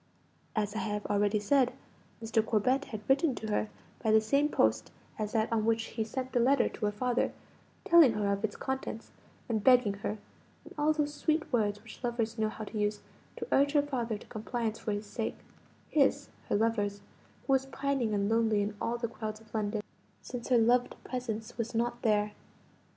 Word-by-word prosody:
As 210 -2 0
I - - -1
have 210 -1 -2
already 205 +1 +2
said, 250 +4 +3 0.5
Mr. 225 0 +2
Corbet 250 +6 +1
had 215 -2 -6
written 275 0 +3
to 220 0 -5
her 210 +1 0 0.3
by 220 - 0
the 220 0 +7
same 280 +7 +2
post - - +2 0.3
as 210 -1 -2
that 220 0 +1
on 220 -1 +2
which 225 0 +2
he 225 - 0
sent 255 +4 -4
the 245 - +2
letter 270 +4 +4
to 215 - -4
her - - 0
father, 245 +4 0 0.5
telling 330 -8 +7
her 205 -2 +1
of 200 +1 -4
its 215 -1 -1
contents, 265 -4 -4 0.4
and 220 -4 -1
begging 250 -5 +5
her 210 - -2 0.5
(in - - -12
all 300 +1 +3
those 295 -1 0
sweet 310 0 -1
words 210 -3 +1
which 230 +2 -13
lovers 235 -2 -1
know 215 0 +2
how 220 - -7
to 215 +1 -5
use) 210 0 0 0.4
to - - -5
urge 285 +1 +4
her 290 -1 +4
father 240 -6 -2
to - - -14
compliance 225 0 -3
for 215 - -3
his 205 +1 -3
sake 220 +2 -3 0.5
his, 285 -1 +2 0.2
her - - +2
lover's 205 -2 0 0.4
who 270 - +2
was 265 0 +2
pining 270 -6 -1
and 200 0 +1
lonely 220 -2 +2
in 205 +1 -3
all 235 +1 0
the 235 0 -2
crowds 215 -1 -6
of 220 0 -21
London, 210 -1 -1 0.4
since 245 -2 -6
her 250 - +4
loved 245 +2 +3
presence 235 -3 -5
was 230 +1 -2
not 240 +1 0
there. 210 -2 +2
225 Hz, 195 wpm, -31 LUFS, 215-255 Hz, 0.5 s, the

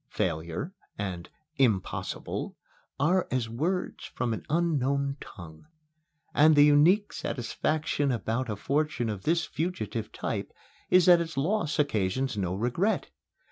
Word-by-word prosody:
"Failure" 85 - -2 0.2
and 95 -4 -4 0.3
"impossible" 110 -9 -1 0.4
are 175 +6 +2
as 125 -3 0
words 160 +11 -2
from 120 -2 -2
an - - -5
unknown 140 -4 +1
tongue. 80 - -11 0.7
And 155 +1 +6
the 145 0 +8
unique 165 +8 +4
satisfaction 145 +3 -1
about 115 +1 -2
a 105 - -1
fortune 140 +1 -1
of 105 -3 -5
this 165 +1 +2
fugitive 120 - -3
type - - -4 0.4
is 180 -1 +6
that 175 -2 +7
its 160 -4 -5
loss 165 +2 0
occasions 130 - 0
no 95 -3 -1
regret. 125 - 0
140 Hz, 125 wpm, -28 LUFS, 110-160 Hz, 0.7 s, the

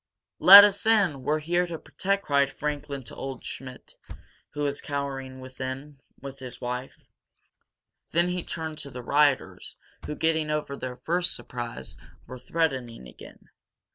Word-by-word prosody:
"Let 200 +2 +12
us 205 -1 +2
in! 195 -11 +3
We're 150 +4 0
here 175 +3 0
to 170 -1 -5
protect 190 +7 -2
you!" - - -24
cried 140 -1 +2
Franklin 145 -2 -4
to - - -10
old 135 -2 -7
Schmidt, 130 -1 -9 0.6
who 145 - -3
was 145 -1 -1
cowering 135 -2 -5
within, 130 +2 -7 0.2
with 135 -1 -9
his 130 -2 -9
wife. 125 +1 -5 1.1
Then 170 +2 +2
he 180 0 -2
turned 160 -1 -5
to 145 - -8
the 125 -2 -8
rioters, 145 +1 +1 0.3
who, 150 - -4
getting 160 -1 0
over 150 -2 -2
their 125 -2 -6
first 175 +7 0
surprise, 120 - -7 0.3
were 130 +1 -9
threatening 130 - -2
again. - - -15
140 Hz, 150 wpm, -26 LUFS, 130-160 Hz, 1.1 s, Let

